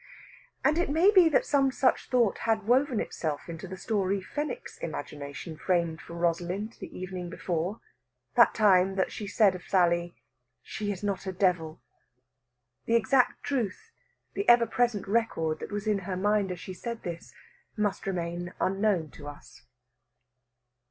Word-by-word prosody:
And 310 +3 +3
it 350 - 0
may 330 +7 +5
be 370 -5 +7
that 305 - +2
some 275 -2 +3
such 260 0 +1
thought 240 -5 +2
had 220 -2 0
woven 255 0 +3
itself 150 -3 -3
into 170 +2 -7
the 190 +1 -7
story 200 -2 0
Fenwick's 290 +9 -5
imagination 145 +1 -6
framed 170 -2 0
for 170 - -10
Rosalind 175 +5 -1
the - - -8
evening 185 -1 -5
before 175 +4 -3 0.5
that - - +5
time 195 -3 +4
that 190 - 0
she 210 - -6
said 200 -1 +4
of 180 - -7
Sally, 175 -2 +2 0.5
"She 205 -1 -4
is 195 0 -6
not 200 -1 -2
a - - -1
devil!" 180 -4 0 1.0
The 230 - +2
exact 240 +3 +2
truth, 260 - -3 0.4
the 400 - 0
ever 240 -1 +7
present 230 -3 0
record 195 -8 0
that - - -7
was 205 0 -3
in 210 -2 +1
her 185 0 -4
mind 205 0 +1
as 180 - -5
she 185 +2 -7
said 235 +5 -6
this, 170 -1 -6 0.5
must 205 -2 -1
remain 175 -1 -3
unknown 195 -5 +1
to 145 - -11
us. 145 0 -12
195 Hz, 160 wpm, -28 LUFS, 175-225 Hz, 1.0 s, be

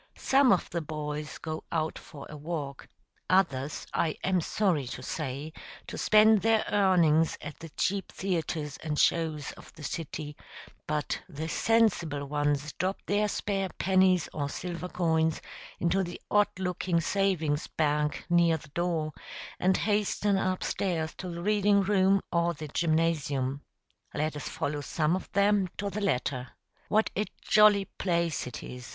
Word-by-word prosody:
] - - -41 0.2
Some 270 -2 +7
of 185 - +2
the 170 - -1
boys 150 -1 -5
go 155 -1 -5
out 160 -1 -1
for 140 -2 -11
a 150 - -9
walk, 145 -2 -5 0.4
others, 150 -7 +1
I 160 -2 0
am 185 -2 +2
sorry 165 -7 0
to - - -6
say, 150 +1 -4 0.3
to - - -7
spend 215 -1 +5
their 225 +1 +3
earnings 170 -6 +4
at 150 0 -8
the 165 - -9
cheap 195 +5 -1
theatres 160 -6 -2
and 150 -2 -4
shows 155 -3 +1
of - - -14
the 155 - -12
city; 150 -2 -5 0.5
but 150 -1 -1
the 160 -1 -5
sensible 175 -7 +2
ones 145 0 -1
drop 190 +2 0
their 210 +1 +2
spare 195 -2 -1
pennies 185 -2 +3
or 145 -2 -2
silver 175 +2 -5
coins 160 -3 +1 0.4
into 180 +3 +2
the 175 -1 -6
odd 205 0 +4
looking 180 -2 0
savings 165 -5 0
bank 150 -1 0
near 170 -2 +4
the 155 -1 -14
door, 165 -1 -1 0.5
and 185 +1 +3
hasten 205 -1 +1
up 185 -1 0
stairs 165 -5 -1
to 185 - -5
the 170 0 -6
reading 205 0 +3
room 195 0 +3
or 170 0 +1
the 155 -1 -7
gymnasium. 155 -4 0 0.5
Let 155 +1 -1
us 145 - -5
follow 145 0 -2
some 155 +3 0
of 185 - -6
them 200 -1 +3
to 200 0 -2
the 210 - -3
latter. 130 -8 -1 0.3
What 215 +1 +2
a 210 - +1 0.2
jolly 210 -2 +5
place 170 -8 -1
it 125 - -7
is! 125 0 -8
170 Hz, 155 wpm, -29 LUFS, 150-190 Hz, 0.5 s, Some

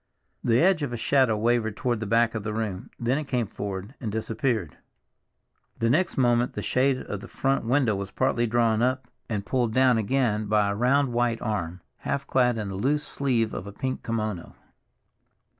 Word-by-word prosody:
The 115 0 +3
edge 180 -2 +4
of 140 -4 -2
a 120 - -3
shadow 130 -2 +2
wavered 110 -1 +1
toward 120 -3 0
the 110 - -4
back 115 +1 +3
of 115 - -3
the 105 +1 -4
room; 105 -4 -3
then 125 +4 +1
it 155 - -4
came 125 -3 0
forward 100 +2 -6
and 110 -4 -3
disappeared. 110 - -2 1.0
The 115 0 +1
next 170 +6 +1
moment 120 -1 +2
the - - -4
shade 130 +1 +2
of 105 - -5
the - - -10
front 135 -2 0
window 125 -3 +2
was 100 0 -4
partly 120 +1 +1
drawn 115 -1 +2
up 130 0 0 0.2
and 105 -3 -2
pulled 120 -3 0
down 130 -3 +4
again 110 -2 0
by 105 -1 +2
a - - -2
round 130 +3 +2
white 120 -1 +1
arm, 90 -6 -3 0.2
half 140 0 -3
clad 125 -3 +2
in 105 -2 -3
the 95 - -5
loose 140 +9 0
sleeve 120 -6 0
of 95 - -5
a - - -6
pink 130 +6 -3
kimono. 110 -6 -3
115 Hz, 190 wpm, -26 LUFS, 105-130 Hz, 1.0 s, edge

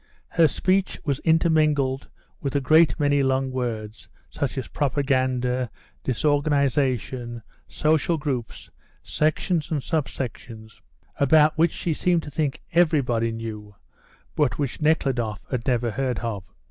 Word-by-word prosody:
Her 165 -1 +4
speech 190 +6 0
was 140 -3 0
intermingled 155 -5 +2 0.3
with 140 -1 -3
a - - +4
great 155 +5 +4
many 145 -1 +3
long 130 0 +1
words, 115 -4 -4 0.2
such - - -3
as - - -3
propaganda, 130 -3 0 0.3
disorganisation, 130 -4 0 0.2
social 160 +2 +1
groups, 135 -7 -4 0.3
sections 155 +1 0
and 150 -5 -2
sub 155 -6 -1
sections, 110 -4 -8 0.4
about 150 +2 +4
which 165 +2 +4
she 170 - -2
seemed 175 +1 +1
to 145 - -8
think 145 -1 -2
everybody 140 -9 +2
knew, 110 -2 -7 0.6
but 135 -8 +1
which 140 +1 -3
Nekhludoff 130 -9 0
had 125 -3 -3
never 120 -2 +1
heard 125 +1 -1
of. 105 -5 -4
135 Hz, 125 wpm, -24 LUFS, 120-155 Hz, 0.6 s, Her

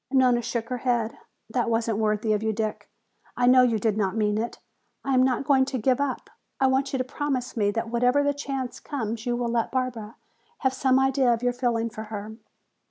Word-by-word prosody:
Nona 255 -3 +4
shook 235 0 -3
her 250 -1 -3
head. 235 -2 -1 0.3
"That 235 +1 -1
wasn't 225 -1 0
worthy 215 0 +1
of 210 - 0
you, 220 0 0
Dick; 215 0 -3 0.5
I 245 - +2
know 255 +1 +7
you 240 -3 +3
did 215 0 0
not 195 -1 0
mean 210 -1 +1
it. 235 +2 -3 0.5
I 275 - 0
am 255 - +5
not 255 0 +2
going 270 -1 +4
to 270 -1 -3
give 255 +3 +1
up. 275 -3 -2 0.3
I 270 - +3
want 265 +1 +2
you 265 - 0
to 255 - 0
promise 260 -1 -3
me 205 -3 +2
that 225 +2 -3
whenever 250 +4 +3
the 285 0 +2
chance 275 -3 -4
comes 230 -4 -4
you 240 - +1
will 240 -1 -1
let 230 -1 0
Barbara 240 -4 -3 0.5
have 265 -2 +2
some 260 0 +2
idea 265 -1 +3
of 235 0 0
your 245 0 +2
feeling 235 -2 -1
for 220 0 -7
her." 210 0 -7
245 Hz, 220 wpm, -26 LUFS, 220-260 Hz, 0.5 s, know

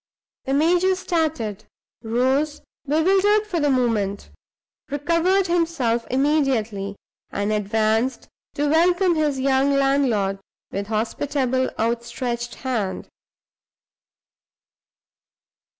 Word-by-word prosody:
The 270 - 0
major 355 +5 +3
started; 310 - -2 0.4
rose, 260 +6 0 0.3
bewildered 385 +8 +3
for 375 -5 -2
the 295 -1 +2
moment; 225 -6 0 0.6
recovered 335 +7 +1
himself 325 -10 0
immediately, 255 -8 0 0.3
and 205 +2 -1
advanced 220 +4 0 0.3
to 290 +1 0
welcome 350 +4 +3
his 300 -4 0
young 270 +1 +2
landlord, 260 -8 +1 0.3
with 200 +1 -4
hospitable, 255 +4 -1
outstretched 235 +1 -2
hand. 220 -7 -2
265 Hz, 85 wpm, -22 LUFS, 225-315 Hz, 0.6 s, major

